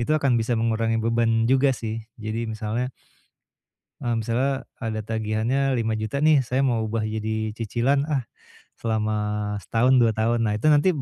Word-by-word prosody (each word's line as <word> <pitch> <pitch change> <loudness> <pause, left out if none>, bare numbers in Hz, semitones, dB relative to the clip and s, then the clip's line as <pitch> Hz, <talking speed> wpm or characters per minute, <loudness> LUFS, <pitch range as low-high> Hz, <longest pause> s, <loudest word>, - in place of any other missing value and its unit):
itu 120 +6 0
akan 140 -3 +2
bisa 115 +1 0
mengurangi 115 0 +1
beban 115 -1 +2
juga 135 +3 +4
sih 110 0 -4 0.2
jadi 110 +1 -4
misalnya 110 +3 -2 1.1
Eee, 120 -1 -1
misalnya 125 +4 -1 0.2
ada 110 -3 -2
tagihannya 110 +3 -1 0.2
Rp5.000.000 110 0 -1
nih 155 -3 +6
saya 130 +2 0
mau 120 -4 +1
ubah 110 0 -1
jadi 110 0 -2
cicilan, 120 +5 +1
ah, 135 -5 0 0.6
selama 110 -1 0 0.5
setahun 125 +5 +2
2 115 -2 +4
tahun 115 +2 +1
nah 105 - +1
itu 105 - -1
nanti, 145 +5 +4
115 Hz, 150 wpm, -24 LUFS, 110-125 Hz, 1.1 s, nih